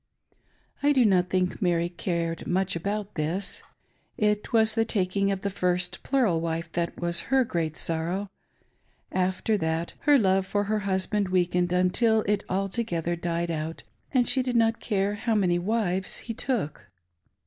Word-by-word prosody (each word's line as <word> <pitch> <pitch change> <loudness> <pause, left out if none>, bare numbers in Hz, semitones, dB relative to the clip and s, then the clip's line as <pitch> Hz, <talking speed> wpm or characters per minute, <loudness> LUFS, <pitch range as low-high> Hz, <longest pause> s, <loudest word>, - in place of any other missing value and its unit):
I 290 +1 +4
do 255 -4 +4
not 180 -3 +3
think 185 +3 0
Mary 170 -2 +2
cared 170 -2 -3
much 190 +1 0
about 200 +4 -3
this. 170 +6 -2 0.6
It 210 -1 0
was 220 -1 +4
the 225 0 +2
taking 195 -2 0
of 195 -1 -2
the 200 - -2
first 180 -1 -1
plural 230 -12 +1
wife 165 0 -3
that 170 0 -2
was 170 -1 0
her 270 -1 +4
great 165 -6 -2
sorrow. 175 +5 -1 0.8
After 185 +3 0
that, 160 0 -1
her 290 -1 +5
love 190 -4 +2
for 205 +1 0
her 215 +1 0
husband 190 +1 0
weakened, 180 -1 +1
until 200 +5 +3
it 210 0 0
altogether 185 -3 -1
died 170 0 -2
out, 160 0 -4 0.3
and 250 -4 +3
she 265 - +3
did 250 -1 -2
not 225 0 +3
care 200 -2 0
how 220 +2 -1
many 180 -4 +2
wives 190 -1 0
he 230 - -5
took. 220 - -3
190 Hz, 160 wpm, -26 LUFS, 175-215 Hz, 0.8 s, her